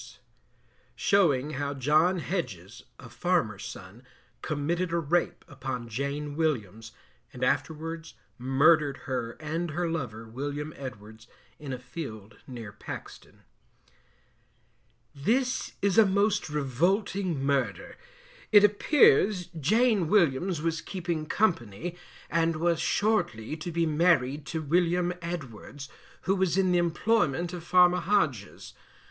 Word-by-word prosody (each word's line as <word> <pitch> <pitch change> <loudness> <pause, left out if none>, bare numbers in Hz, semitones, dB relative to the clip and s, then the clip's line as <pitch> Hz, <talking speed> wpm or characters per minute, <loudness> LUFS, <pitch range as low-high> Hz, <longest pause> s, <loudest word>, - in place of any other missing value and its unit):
Showing 155 -8 +2
how 140 0 -3
John 155 +7 +3
Hedges, 125 - -5
a 125 - -12
farmer's 120 - -1
son, 100 +4 -10 0.4
committed 165 +4 -2
a 170 - +1
rape 170 +2 0
upon 130 -3 -5
Jane 140 +4 -3
Williams, 115 - -2 0.4
and 125 - -6
afterwards 160 +3 -2 0.2
Murdered 140 +3 +3
her 125 -3 -3
and 160 +3 -4
her 170 +3 -2
lover, 120 -9 -4
William 145 +5 -5
Edwards, 110 -4 -10 0.3
in 145 -3 -7
a 130 - -3
field 120 -5 -8
near 115 -5 -8
Paxton. 110 - -10 1.7
This 250 - 0
is 200 +1 +4
a 220 - +8
most 200 -1 +1
revolting 170 - 0
Murder. 140 -2 -1 0.6
It 205 -2 +8
appears 205 - +4
Jane 215 - +3
Williams 170 -2 +2
was 165 -2 -1
keeping 170 -5 -4
company, 170 - -1 0.3
and 165 0 +1
was 170 +1 +1
shortly 205 - 0
to 165 +2 -5
be 170 0 +1
married 150 -3 +2
to 160 -2 -3
William 175 +3 +1
Edwards, 145 -4 -7 0.3
who 190 +3 +1
was 185 -2 +1
in 190 -1 +3
the 175 - +3
employment 175 -2 +1
of 175 -2 -6
Farmer 180 +1 +5
Hodges. 160 - -1
155 Hz, 120 wpm, -28 LUFS, 130-175 Hz, 1.7 s, a